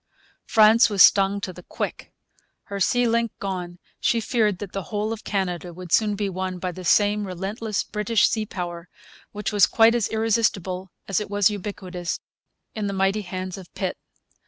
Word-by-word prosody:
France 220 +1 +6
was 200 -3 +6
stung 195 0 +5
to 190 -2 -5
the 180 - -11
quick. - - -5 0.5
Her 200 0 -6
sea 245 +5 +2
link 230 -1 +1
gone, 180 -3 -4 0.2
she 235 - +2
feared 215 -4 +1
that 200 -1 -7
the 195 - -3
whole 215 +1 -1
of 220 - -9
Canada 180 -3 -3
would 180 -1 -9
soon 210 0 +3
be 205 0 -1
won 185 -1 -3
by 180 0 -3
the 185 +1 -9
same 205 +3 +3
relentless 195 +4 -3
British 210 0 +1
sea 220 -2 -2
power, 175 -2 -6 0.4
which 210 0 -3
was 205 -2 +6
quite 225 0 +5
as 235 -4 +1
irresistible 200 -5 0 0.2
as 195 - +1
it 210 - -5
was 205 0 +3
ubiquitous 185 -3 -5 0.5
in 210 -2 -3
the 200 - -2
mighty 195 +2 +1
hands 185 0 -5
of 185 - -13
Pitt. - - -2
200 Hz, 180 wpm, -24 LUFS, 185-215 Hz, 0.5 s, France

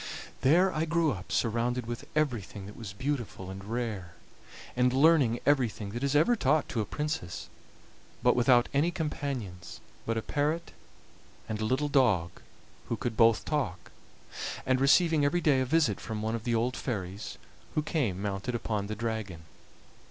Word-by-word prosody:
There 180 +7 +4
I 155 +1 0
grew 165 -1 +2
up 95 -5 -7
surrounded 120 +1 0
with 120 0 -6
everything 120 -10 -1
that 105 - -10
was 110 -5 -7
beautiful 105 - -3
and 95 0 -8
rare, 105 -6 -4 0.6
and 125 0 +3
learning 135 -4 +4
everything 120 -8 +1
that 120 +4 -4
is 140 +1 +1
ever 160 +12 +5
taught 155 - +2
to 115 - -1
a - - -2
princess, 150 - -4 0.7
but - - +5
without 120 0 +5
any 145 +5 +3
companions 140 - -4 0.3
but 115 0 0
a 110 - -2
parrot 155 +4 -1 0.8
and 110 -1 -3
a - - 0
little 130 +6 +1
dog, 110 - +3 0.6
who - - -1
could 120 -2 -3
both 115 -1 +4
talk; 95 - -2 0.7
and 130 0 +2
receiving 160 +2 +5
every 145 +5 +2
day 145 -6 +3
a - - +1
visit 150 -8 +2
from 110 -1 -4
one 110 +1 -1
of 115 0 -4
the 120 -1 +1
old 120 +3 0
fairies, 100 -4 -4 0.4
who 155 - +1
came 125 - -1
mounted 100 +4 -2
upon 105 -3 -2
the 110 - -4
dragon. 110 -6 -4
120 Hz, 165 wpm, -29 LUFS, 105-145 Hz, 0.8 s, ever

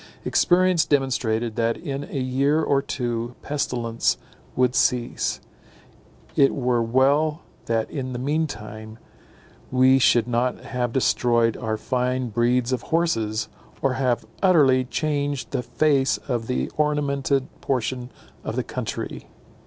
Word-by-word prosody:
Experience 180 -1 +3
demonstrated 120 -5 0
that 115 0 +1
in 140 0 -5
a 140 - -4
year 135 +4 +1
or 140 -2 +2
two 120 -3 -3
pestilence 120 -5 -1 0.4
would 125 -1 +2
cease; 125 -2 +1 1.0
it 135 - +4
were 125 -3 +1
well 140 +7 +2 0.2
that 115 -1 0
in 130 -3 -4
the 125 - -4
mean 150 +5 0
time 110 -3 -9 0.7
we 130 +1 +5
should 120 -2 +4
not 125 +1 0
have 125 -2 -2
destroyed 120 -2 +2
our 110 -1 -2
fine 125 +1 -1
breeds 120 +2 +1
of 125 - -1
horses, 115 -11 0 0.4
or 135 - +2
have 130 -2 0 0.2
utterly 140 -9 +4
changed 145 0 -2
the 130 -2 -1
face 140 +1 +2
of 120 -3 -2
the 125 - -1
ornamented 140 -3 +1
portion 125 -1 -2 0.3
of - - -4
the - - 0
country. - - -5
130 Hz, 130 wpm, -24 LUFS, 120-140 Hz, 1.0 s, we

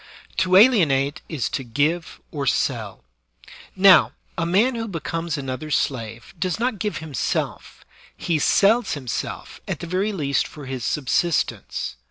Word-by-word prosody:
To 185 0 +2
alienate 160 - +4
is 150 -7 -2
to 135 - -3
give 150 +8 -1
or 140 -3 -3
selL 110 -6 -1 0.7
Now, 190 -2 +6 0.2
a 165 -1 -1
man 210 +9 +3
who 225 -1 -4
becomes 165 -2 -3
another's 140 +2 -2
slave 115 -3 -4
does 185 +3 -1
not 240 -3 -1
give 210 -1 -2
himself; 155 -3 -3 0.3
he 165 -3 0
sells 220 - +3
himself 130 -6 -5
at - - -3
the - - -6
very 185 +5 -1
least 145 -8 0
for 150 -2 -11
his 130 -2 -5
subsistence. 145 - -1
160 Hz, 140 wpm, -23 LUFS, 135-190 Hz, 0.7 s, Now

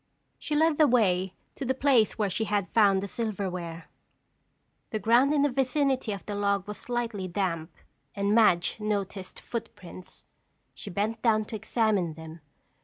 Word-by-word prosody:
She 300 - -3
led 315 0 +3
the 305 - +7
way 190 -7 +2 0.2
to - - -6
the 260 0 0
place 260 -6 +3
where 210 -2 +1
she 220 +5 -1
had 205 -3 -1
found 200 -3 +4
the - - -3
silverware. 185 -6 -4 1.0
The 220 - -2
ground 235 +6 +4
in 290 -2 +3
the 290 - +2
vicinity 265 -2 0
of 200 -4 -6
the 205 - -4
log 200 -1 0
was 210 - -7
slightly 235 -6 -3
damp 175 -3 -2 0.5
and 200 0 +1
Madge 200 -6 +4
noticed 200 -3 -3
footprints. 185 -6 -8 0.5
She - - -9
bent 210 +4 -2
down 215 -2 +2
to 220 - -7
examine 210 -6 0
them. 160 0 -10
210 Hz, 160 wpm, -28 LUFS, 190-235 Hz, 1.0 s, the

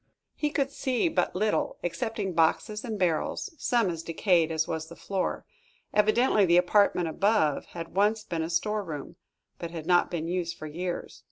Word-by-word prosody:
He 300 - -1
could 275 -2 -1
see 260 +3 0
but 245 - 0
little, 210 +3 0
excepting 190 +3 -2
boxes 210 +6 +1
and 225 -4 -4
barrels, 180 - 0
some 235 -4 +2
as 165 -1 -5
decayed 165 0 +2
as 160 -1 0
was 160 0 -3
the - - -10
floor. 195 -2 -3 0.5
Evidently 215 +1 +4
the 175 -2 +5
apartment 180 -1 +3
above 160 -4 +1
had 165 0 -6
once 210 +2 +2
been 170 -5 -3
a 160 - -2
store 210 +5 0
room, 150 -6 -7 0.4
but 170 - -4
had 165 -2 -7
not 175 0 +3
been 165 -2 -3
used 170 -1 -2
for - - -8
years. 175 +4 -5
180 Hz, 175 wpm, -28 LUFS, 165-215 Hz, 0.5 s, the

